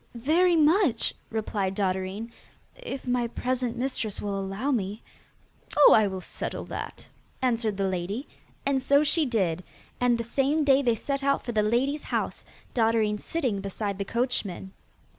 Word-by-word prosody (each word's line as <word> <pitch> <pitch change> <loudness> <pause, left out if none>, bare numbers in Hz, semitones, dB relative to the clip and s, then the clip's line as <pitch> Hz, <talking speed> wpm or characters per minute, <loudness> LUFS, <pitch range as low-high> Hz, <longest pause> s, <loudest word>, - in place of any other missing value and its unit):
'Very 330 +9 +3
much,' 315 - +3 0.2
replied 205 -3 -2
Dotterine, 190 +3 -2 0.4
'if - - -7
my 245 -1 +1
present 250 0 -2
mistress 240 -5 -2
will 205 -1 -3
allow 195 +8 -2
me.' 210 -3 -2 0.7
'Oh, 295 - +9
I 215 -2 +5
will 190 -1 -4
settle - - -5
that,' - - -7 0.3
answered 230 -5 0
the 195 -1 +1
lady; 190 +8 -3 0.4
and 275 -1 +2
so 280 +3 +4
she 305 0 +2
did, 185 -7 0 0.4
and 245 -1 +3
the 235 - -2
same 275 +6 +1
day 275 -1 +5
they 240 -4 +2
set 275 +5 -1
out 275 0 +1
for 240 - -2
the 215 -2 +2
lady's 255 +7 0
house, - - -2 0.3
Dotterine 220 -3 +2
sitting 255 -12 -2
beside 200 0 -3
the - - 0
coachman. 210 -5 -2
235 Hz, 155 wpm, -27 LUFS, 205-275 Hz, 0.7 s, Oh